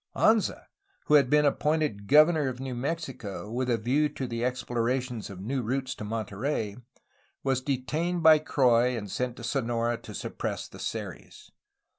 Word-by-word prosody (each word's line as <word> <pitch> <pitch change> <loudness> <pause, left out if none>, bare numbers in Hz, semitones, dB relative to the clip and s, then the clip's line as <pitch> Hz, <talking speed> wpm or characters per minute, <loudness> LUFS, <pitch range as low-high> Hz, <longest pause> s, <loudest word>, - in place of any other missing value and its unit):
Anza, 220 -1 +2 0.4
who - - +1
had 140 -4 +6
been 150 +1 +4
appointed 150 -8 0
governor 155 +1 +5
of 125 -1 -4
New 130 -1 -4
Mexico 125 -7 -4
with 125 +2 -1
a 120 - +3
view 135 +7 +1
to 135 - -5
the 115 -1 -3
exploration 125 0 -1
of 95 -2 -9
new 130 +7 -2
routes 130 +3 -2
to - - -8
Monterey, 110 +1 -3 0.7
was 135 -1 +1
detained 150 +7 -1
by 155 -1 +8
Croix 125 -4 +3
and 100 -3 -6
sent 125 -1 -2
to 120 - -10
Sonora 120 -1 0
to 105 - -9
suppress - - -4
the - - -13
Seris. - - -6
125 Hz, 160 wpm, -28 LUFS, 115-145 Hz, 0.7 s, by